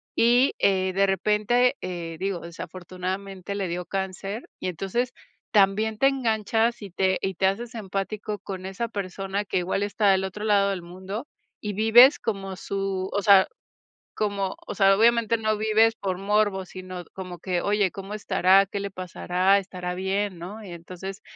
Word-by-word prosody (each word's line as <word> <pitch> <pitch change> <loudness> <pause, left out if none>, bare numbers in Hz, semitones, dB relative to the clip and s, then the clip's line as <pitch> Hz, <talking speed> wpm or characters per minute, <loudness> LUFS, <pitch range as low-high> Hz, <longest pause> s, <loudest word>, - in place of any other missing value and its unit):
y, 245 +3 +4
eh, 190 -1 +2
de 195 +1 +3
repente, 210 +5 +2
eh, 170 -3 -5
digo, 190 -2 -2
desafortunadamente 185 +3 -6
le 195 -2 -2
dio 175 +1 -3
cáncer 195 +4 -4
y - - -3
entonces 195 +8 -2 0.4
también 210 +2 +3
te 270 - +4
enganchas 230 -3 +1
y 200 - -8
te 190 +1 +1
y 195 -1 -2
te 190 - +1
haces 230 +5 -3
empático 205 0 -4
con 190 -1 -7
esa 195 +5 -3
persona 195 0 -3
que - - -1
igual 185 +3 -1
está 205 0 +1
del 190 0 +2
otro 210 +3 -6
lado 200 -2 +3
del 190 -3 -3
mundo 190 +8 -7 0.3
y 210 -1 -3
vives 230 +7 +7
como 195 -3 -3
su 195 -1 -3
o 200 - +1
sea, 195 -2 +7 0.7
como, 200 -2 -1
o - - -5
sea, 195 -1 +5
obviamente 230 0 +4
no 215 -1 0
vives 220 +1 +3
por 190 -4 -3
morbo, 200 -1 +1
sino 185 -1 -8
como 180 -2 -7
que: 180 +1 -1
"Oye, 205 -2 +1
¿cómo 195 +1 -8
estará?, 195 -2 +4
¿qué 200 +1 -4
le 200 - -4
pasará?, 185 +1 +1
¿estará 180 -2 -5
bien?", 190 0 -1
¿no?, 205 +6 -8
y 190 - -9
entonces 185 +3 -8
195 Hz, 170 wpm, -25 LUFS, 185-215 Hz, 0.7 s, vives